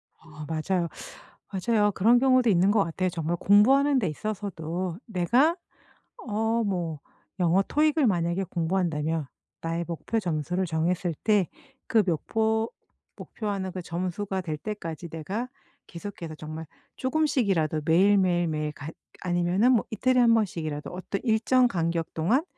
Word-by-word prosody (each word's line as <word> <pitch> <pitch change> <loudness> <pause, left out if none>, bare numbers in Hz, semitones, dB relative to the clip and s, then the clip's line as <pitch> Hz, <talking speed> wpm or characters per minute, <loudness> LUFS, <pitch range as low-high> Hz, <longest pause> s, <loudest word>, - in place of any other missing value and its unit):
어. 150 -2 -11
맞아요. 170 +2 -1 0.6
맞아요. 210 +1 +2
그런 230 +6 +4
경우도 255 -2 +4
있는 190 0 +4
것 205 -2 +3
같아요. 185 +3 -1
정말 170 0 -2
공부하는 265 +9 +5
데 205 - 0
있어서도 180 -2 -4
내가 240 - +2 0.7
어 225 +2 +1
뭐 175 -6 -2 0.4
영어 180 +2 +4
토익을 305 -2 +2
만약에 175 -1 +1
공부한다면 165 -3 -1 0.3
나의 165 +1 -2
목표 175 +7 -2
점수를 175 +1 -1
정했을 170 +1 -1
때 205 -5 +3 0.4
그 230 -4 +4
목표- 220 +6 0 0.5
목표하는 200 -4 -4
그 185 - -5
점수가 185 +3 -3
될 160 -4 -4
때까지 170 -4 -6
내가 190 +10 -4 0.4
계속해서 170 -2 -7
정말 155 +1 -7 0.3
조금씩이라도 225 - +1
매일, 190 +6 +5
매일, 175 -2 +2
매일 155 -1 -2
갓 150 +1 -8 0.3
아니면은 180 +6 +2
뭐 235 - +3
이틀에 255 +4 +1
1 235 -1 +5
번씩이라도 160 -9 -2
어떤 185 +2 -4
일정 245 +2 +3
간격 170 -3 -1
동안 225 - +2
185 Hz, 305 characters per minute, -26 LUFS, 165-220 Hz, 0.7 s, 공부하는